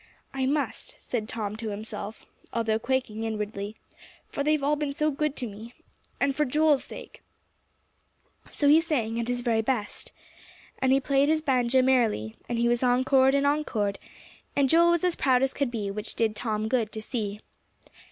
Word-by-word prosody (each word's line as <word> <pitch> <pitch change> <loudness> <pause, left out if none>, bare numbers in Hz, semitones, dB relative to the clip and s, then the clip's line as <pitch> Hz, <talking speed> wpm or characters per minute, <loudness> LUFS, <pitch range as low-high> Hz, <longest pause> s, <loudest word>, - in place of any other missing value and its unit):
"I 265 -1 0
must," 290 +1 -2
said 220 -3 -4
Tom 215 -2 -3
to 220 -1 -4
himself, 210 +1 -6 0.3
although 225 -1 0
quaking 240 -3 -1
inwardly, 210 -1 -4 0.5
"for 280 - -2
they've 305 -1 +1
all 295 +2 +3
been 290 -1 -2
so 305 +2 +1
good 300 +1 -1
to 250 - -4
me 220 +3 -10 0.4
and 280 -1 +1
for 300 - +2
Joel's 300 +1 +3
sake!" - - -11 1.3
So 290 - 0
he 300 +3 +7
sang 235 -9 -1
at 235 - -2
his 245 0 -1
very 230 -2 +1
best. 220 -2 -3 0.7
And 260 - +2
he 270 - +5
played 275 +1 +2
his 310 0 +2
banjo 255 -2 +3
merrily, 230 - +2
and 240 - -1
he 235 0 +2
was 240 0 +2
encored 260 +2 +4
and 280 0 +2
encored; 225 -9 0 0.6
and 275 -2 +3
Joel 340 +1 +6
was 345 0 +2
as 360 -2 +2
proud 260 -2 +3
as 270 - +1
could 280 -2 -1
be, 210 -4 -3
which 210 +2 -3
did 220 -2 +1
Tom 215 -1 -2
good 225 -3 0
to 220 - -5
see. 210 -3 -3
250 Hz, 180 wpm, -27 LUFS, 220-280 Hz, 1.3 s, he